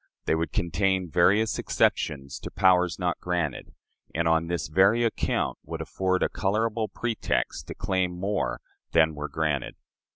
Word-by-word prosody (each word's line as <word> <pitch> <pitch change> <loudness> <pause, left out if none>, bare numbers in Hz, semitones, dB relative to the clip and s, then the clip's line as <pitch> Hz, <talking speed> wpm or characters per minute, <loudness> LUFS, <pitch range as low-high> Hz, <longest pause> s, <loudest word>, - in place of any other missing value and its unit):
They - - +2
would 80 +1 -1
contain 95 -1 0
various 100 +6 +3
exceptions 70 -1 0
to - - -7
powers 90 -2 +3
not 90 -2 -1
granted, 85 -5 -3 0.4
and 85 +1 +1
on 80 0 +2
this 85 0 -2
very 95 +9 +4
account 115 - -1
would - - -6
afford 95 -1 0
a - - +3
colorable 110 +3 0
pretext 115 -1 -2
to - - -7
claim 95 -3 -1
more 100 +2 -1 0.3
than 80 -1 +4
were 75 0 -5
granted. 75 -3 -1
90 Hz, 150 wpm, -26 LUFS, 80-100 Hz, 0.4 s, very